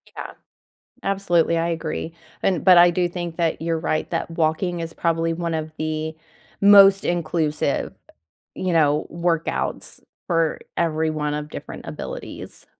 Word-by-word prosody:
Yeah. -, -, -6 dB, 0.7 s
Absolutely, 175 Hz, -4 st, +2 dB
I 165 Hz, +1 st, 0 dB
agree. 165 Hz, 0 st, -4 dB, 0.3 s
And 185 Hz, -4 st, +1 dB
but 185 Hz, -2 st, +7 dB
I 175 Hz, 0 st, +8 dB
do 175 Hz, 0 st, 0 dB
think 175 Hz, -1 st, -5 dB
that 165 Hz, -2 st, 0 dB
you’re 165 Hz, 0 st, -1 dB
right 155 Hz, -1 st, -1 dB
that -, -, -2 dB
walking 165 Hz, +2 st, 0 dB
is 165 Hz, 0 st, -5 dB
probably 165 Hz, 0 st, 0 dB
one 170 Hz, 0 st, -3 dB
of 155 Hz, 0 st, -3 dB
the 155 Hz, 0 st, -3 dB, 0.5 s
most 200 Hz, -1 st, +8 dB
inclusive, 155 Hz, -4 st, -1 dB, 0.6 s
you 185 Hz, -, -2 dB
know, 150 Hz, -2 st, +3 dB
workouts 170 Hz, -1 st, -2 dB, 0.3 s
for 165 Hz, -3 st, +1 dB, 0.2 s
everyone 155 Hz, -2 st, 0 dB
of 150 Hz, 0 st, -4 dB
different -, -, -8 dB
abilities. -, -, -8 dB
165 Hz, 135 wpm, -22 LUFS, 155-175 Hz, 0.7 s, I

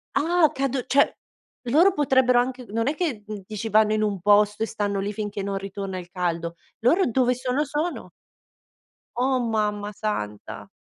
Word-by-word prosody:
Ah! 345 Hz, +3 st, +2 dB
O -, -, +1 dB
cado 270 Hz, -1 st, -1 dB
cioè 280 Hz, +1 st, +4 dB, 0.6 s
loro 335 Hz, +10 st, +5 dB
potrebbero 260 Hz, -5 st, +3 dB
anche 255 Hz, +1 st, -2 dB
non 230 Hz, +4 st, -1 dB
è 300 Hz, -, 0 dB
che 280 Hz, -, -2 dB, 0.2 s
dici 215 Hz, +2 st, -5 dB
vanno 215 Hz, 0 st, +4 dB
in 215 Hz, -, +1 dB
un 205 Hz, -3 st, -1 dB
posto 210 Hz, +2 st, +4 dB
e -, -, +1 dB
stanno 205 Hz, -2 st, -2 dB
lì 200 Hz, +1 st, -2 dB
finché 205 Hz, -1 st, -4 dB
non 200 Hz, 0 st, -2 dB
ritorna 195 Hz, -1 st, -5 dB
il 175 Hz, 0 st, -11 dB
caldo. 170 Hz, -2 st, -2 dB, 0.2 s
Loro 330 Hz, -, +3 dB
dove 250 Hz, +1 st, +2 dB
sono, 255 Hz, +4 st, -1 dB
sono. 300 Hz, +5 st, -3 dB, 1.1 s
Oh 255 Hz, +1 st, +1 dB
mamma 210 Hz, -3 st, -1 dB
santa! 105 Hz, -, -5 dB
220 Hz, 165 wpm, -24 LUFS, 205-260 Hz, 1.1 s, loro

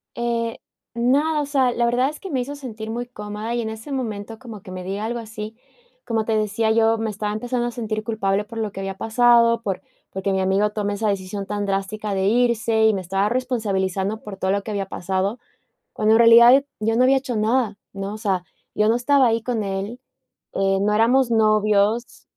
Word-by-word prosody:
Eh, 235 Hz, -1 st, -2 dB, 0.4 s
nada, 285 Hz, +6 st, +2 dB
o -, -, -2 dB
sea, 270 Hz, -3 st, +2 dB
la 235 Hz, 0 st, 0 dB
verdad 250 Hz, +3 st, +2 dB
es 305 Hz, -, -9 dB
que 385 Hz, -, -8 dB
me 260 Hz, -, 0 dB
hizo 285 Hz, +4 st, -5 dB
sentir 225 Hz, -6 st, -7 dB
muy 240 Hz, +2 st, -4 dB
cómoda, 210 Hz, -1 st, -6 dB
y 240 Hz, -, 0 dB
en 220 Hz, -, -3 dB
ese 220 Hz, +6 st, -8 dB
momento 225 Hz, -4 st, -4 dB
como 230 Hz, -5 st, -10 dB
que 185 Hz, -, -11 dB
me 185 Hz, 0 st, -6 dB
diga 195 Hz, +3 st, -4 dB
algo 235 Hz, +1 st, -3 dB
así, 220 Hz, -1 st, -7 dB, 0.5 s
como 225 Hz, -2 st, -1 dB
te 220 Hz, -1 st, +1 dB
decía, 215 Hz, +1 st, 0 dB
yo 225 Hz, 0 st, +3 dB
me 225 Hz, 0 st, -2 dB
estaba 210 Hz, 0 st, -3 dB
empezando 240 Hz, +2 st, -2 dB
a -, -, -3 dB
sentir 215 Hz, -2 st, -4 dB
culpable 210 Hz, -2 st, -1 dB
por 230 Hz, -, -10 dB
lo 215 Hz, -2 st, -2 dB
que 195 Hz, -, -8 dB
había 195 Hz, 0 st, -4 dB
pasado, 235 Hz, +1 st, +4 dB
por 195 Hz, -4 st, -3 dB, 0.3 s
porque 195 Hz, +1 st, -2 dB
mi 190 Hz, -, +1 dB
amigo 195 Hz, +3 st, +2 dB
tome 205 Hz, -1 st, -2 dB
esa 210 Hz, +1 st, -1 dB
decisión 195 Hz, 0 st, -3 dB
tan 205 Hz, 0 st, -3 dB
drástica 200 Hz, +1 st, -2 dB
de 190 Hz, 0 st, 0 dB
irse, 225 Hz, -1 st, +2 dB
y 220 Hz, -, +5 dB
me 195 Hz, -, -2 dB
estaba 195 Hz, +3 st, 0 dB
responsabilizando 210 Hz, -5 st, -1 dB
por 205 Hz, -2 st, -8 dB
todo 190 Hz, 0 st, 0 dB
lo 200 Hz, 0 st, 0 dB
que 220 Hz, -, -6 dB
había 200 Hz, -2 st, -2 dB
pasado, 190 Hz, +4 st, -2 dB, 0.6 s
cuando 215 Hz, +1 st, +2 dB
en -, -, +5 dB
realidad, 235 Hz, +3 st, +8 dB
yo 225 Hz, +1 st, 0 dB
no 250 Hz, -, +4 dB
había 270 Hz, +1 st, +5 dB
hecho 260 Hz, -3 st, -2 dB
nada, 220 Hz, -1 st, +1 dB
¿no? 195 Hz, +1 st, -5 dB
O -, -, -7 dB
sea, 195 Hz, -5 st, -1 dB, 0.3 s
yo 210 Hz, +1 st, +2 dB
no 230 Hz, -, +4 dB
estaba 265 Hz, +2 st, +3 dB
ahí 230 Hz, -1 st, +1 dB
con 230 Hz, -3 st, -2 dB
él, 195 Hz, +5 st, -4 dB, 0.6 s
eh, 195 Hz, 0 st, +1 dB
no 210 Hz, +1 st, +1 dB
éramos 240 Hz, +3 st, +3 dB
novios. 215 Hz, +1 st, +2 dB
220 Hz, 215 wpm, -22 LUFS, 200-235 Hz, 0.6 s, realidad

